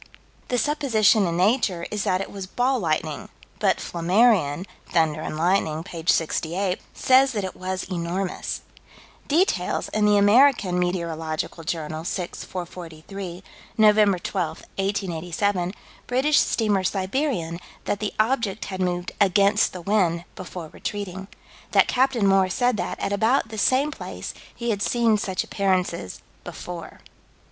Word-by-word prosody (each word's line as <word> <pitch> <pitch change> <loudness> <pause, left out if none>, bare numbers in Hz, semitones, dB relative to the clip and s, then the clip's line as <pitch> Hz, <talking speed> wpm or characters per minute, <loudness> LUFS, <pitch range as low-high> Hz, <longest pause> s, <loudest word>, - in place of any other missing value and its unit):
The 250 - 0
supposition 230 -8 +3
in 170 0 -1
Nature 190 -3 +2
is 210 -2 -2
that 185 0 +1
it - - -6
was 195 -2 -6
"ball 250 +5 +1
lightning," 155 -4 -2 0.3
but - - +3
Flammarion, 180 -2 +2 0.2
Thunder 155 -2 +1
and 155 - -4
Lightning, 165 -2 +1
p. 170 -3 -8
68, 180 +4 +1
says 265 +1 +4
that 205 -3 -2
it 190 - -5
was 185 0 -3
enormous. 180 +1 -3 0.7
Details 345 +7 +1
in 215 0 +1
the 205 0 +5
American 205 -3 +5
Meteorological 165 -2 -2
Journal, 155 0 -3
6 175 0 -4
443 180 +1 -7 0.3
Nov. 215 -1 +6 0.3
12, 185 -4 -1 0.3
1887 185 -1 -1 0.4
British 275 +4 +3
steamer 210 -4 +1
Siberian 190 - -1 0.3
that 205 - -1
the 210 0 -3
object 220 -3 +1
had 190 -1 -5
moved 180 -1 -1
"against 200 +2 +4
the 180 - -7
wind" 175 -4 +1
before 175 -3 -7
retreating 190 0 -5 0.5
that - - +5
Captain 255 -4 +2
Moore 195 -1 +4
said 245 +5 +1
that - - -3
at 200 - -1
about 225 +3 +2
the 220 - -7
same 265 +8 +3
place - - -7 0.2
he 235 -1 -2
had 200 -2 -2
seen 230 -1 +3
such 190 -3 -1
appearances 185 - -1 0.2
before. 175 -2 -8
190 Hz, 135 wpm, -24 LUFS, 175-215 Hz, 0.7 s, Nov